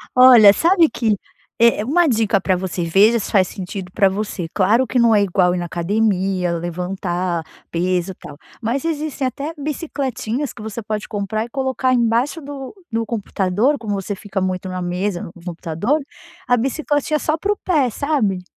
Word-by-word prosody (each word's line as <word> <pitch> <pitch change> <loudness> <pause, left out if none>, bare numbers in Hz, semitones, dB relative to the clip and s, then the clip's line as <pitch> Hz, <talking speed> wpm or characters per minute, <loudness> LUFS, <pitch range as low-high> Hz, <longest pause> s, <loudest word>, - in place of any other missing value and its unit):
Olha, 250 -5 +9
sabe 335 - +4
que 220 -3 +1 0.4
eh, 230 -2 +3
uma 345 +7 +3
dica 220 -7 +2
para 185 -1 +1
você, 185 -1 -3
veja 200 +8 +4
se 220 - -4
faz 190 -3 +4
sentido 185 0 -6
pra 200 -3 +4
você. 200 -2 -3
Claro 215 +7 +3
que 245 +2 0
não 230 -2 +5
é 205 - +4
igual 180 -2 +2
ir - - -2
na 175 - -3
academia, 190 0 0
levantar 175 0 -2 0.3
peso 180 +1 0
e - - -11
tal, 145 - -11 0.3
mas 240 +5 -1
existem 310 -3 -2
até 280 +5 -3
bicicletinhas 280 -3 -3
que 225 - -12
você 220 +2 -5
pode 210 0 -4
comprar 215 +1 -2
e - - -13
colocar 260 0 0
embaixo 240 +6 +1
do 275 0 -8 0.2
do 225 0 -1
computador, 210 +4 0
como 220 -5 -4
você 200 +1 -3
fica 195 -1 -4
muito 185 0 -2
na 185 0 -4
mesa, 180 +1 -2
no - - -8
computador, 175 - -1 0.4
a 245 -1 +3
bicicletinha 290 +4 0
só 310 +1 -1
para 400 +5 0
o - - -14
pé, 300 -8 +2
sabe. 220 -8 -1
215 Hz, 180 wpm, -20 LUFS, 185-260 Hz, 0.4 s, Olha